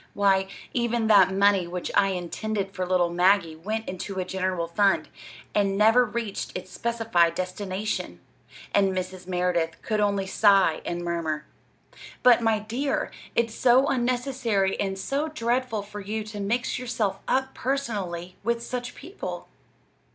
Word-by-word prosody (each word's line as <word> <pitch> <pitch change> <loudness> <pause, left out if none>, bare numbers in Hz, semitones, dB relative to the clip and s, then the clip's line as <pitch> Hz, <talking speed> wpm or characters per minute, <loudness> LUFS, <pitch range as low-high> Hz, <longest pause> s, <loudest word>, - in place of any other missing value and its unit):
"Why, 195 -1 +3 0.3
even 235 -2 0
that 195 -3 +7
money 195 -2 +3
which 180 0 -4
I 200 -1 +4
intended 195 +2 -3
for 185 -2 -3
little 180 -2 +2
Maggie 175 -2 +3
went 215 +7 -4
into 190 +1 -5
a 185 - -1
general 185 -2 -1
fund, 195 +4 +2 0.4
and 195 -1 +1
never 225 +4 +6
reached 220 -4 -4
its 185 0 -9
specified 225 -8 +1
destination." 190 +2 -3 0.5
And 195 -1 +3
Mrs. 185 0 -5
Merideth 180 -2 0
could 215 -2 -1
only 200 -2 +1
sigh 195 -4 +4
and 175 0 -3
murmur: 160 -3 -2 0.8
"But, 245 -1 +7
my 225 -1 +3
dear, 235 +7 -2 0.2
it's 230 -1 +1
so 255 +3 +4
unnecessary 245 -5 0
and 195 -1 -1
so 280 +10 -1
dreadful 240 -6 -1
for 205 +1 -8
you 215 +2 -3
to 215 -1 -8
mix 235 +6 -1
yourself 220 -6 -2
up 265 0 0
personally 200 -10 -3
with 235 0 0
such 245 0 -5
people!" 355 +8 -7
200 Hz, 145 wpm, -26 LUFS, 185-235 Hz, 0.8 s, that